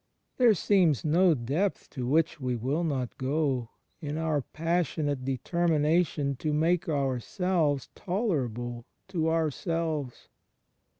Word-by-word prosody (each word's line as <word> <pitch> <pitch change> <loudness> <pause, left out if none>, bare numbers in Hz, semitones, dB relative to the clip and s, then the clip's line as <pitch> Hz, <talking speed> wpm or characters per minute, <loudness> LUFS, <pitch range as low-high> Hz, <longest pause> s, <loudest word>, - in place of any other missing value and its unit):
There 240 -4 +5
seems 175 - +2
no 170 +2 +4
depth 145 - -2
to 125 -4 -4
which 155 +3 +2
we 125 -1 -1
will 135 +8 -1
not 135 -7 -2
go, 130 -3 0 0.3
in 150 -1 -3
our 160 -3 0
passionate 155 -3 -1
deter 135 +7 -1
mination 150 -2 +2
to 155 - -1
make 165 +4 +1
ourselves 145 +2 0
tolerable 125 - -2 0.2
to 165 -4 0
ourselves. 160 -3 -2
155 Hz, 115 wpm, -28 LUFS, 135-170 Hz, 0.3 s, There